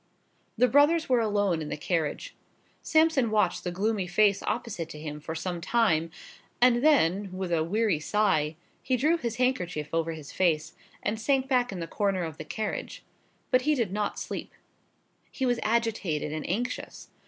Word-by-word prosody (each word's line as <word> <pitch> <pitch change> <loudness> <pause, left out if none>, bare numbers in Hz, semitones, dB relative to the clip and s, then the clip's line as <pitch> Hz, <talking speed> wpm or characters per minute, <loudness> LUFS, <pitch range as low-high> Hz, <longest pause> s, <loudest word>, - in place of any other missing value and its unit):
The 250 - +5
brothers 295 +6 +4
were 250 -2 +3
alone 205 -6 +1
in 150 - -5
the - - -3
carriage. 165 - -2 0.5
Sampson 315 -6 +3
watched 215 -1 +1
the 180 - -2
gloomy 195 +1 -1
face 200 +2 +3
opposite 210 -8 -3
to 150 - -9
him 150 -1 -6
for 160 +2 -6
some 175 +1 -4
time, 165 -6 +2 0.5
and 245 0 +4
then, 205 - +3
with 185 -1 -4
a 165 -2 +2
weary 205 -1 +1
sigh, 155 -4 +1 0.3
he 255 -1 0
drew 305 +7 +3
his 235 -7 -3
handkerchief 185 - -1
over 165 0 0
his 155 -3 -9
face, 160 -4 +1 0.3
and 220 +1 -2
sank 270 +2 +1
back 250 -3 +2
in 185 -3 -5
the - - -2
corner 195 0 -1
of 160 -2 -6
the 155 - -6
carriage. 215 +6 -4 0.5
But 255 - +4
he 300 +3 +2
did 225 -8 -1
not 210 0 -2
sleep. - - -6 0.8
He 265 - -3
was 245 -2 +1
agitated 215 -9 0
and 155 - -4
anxious. 235 +7 -4
205 Hz, 175 wpm, -28 LUFS, 165-245 Hz, 0.8 s, The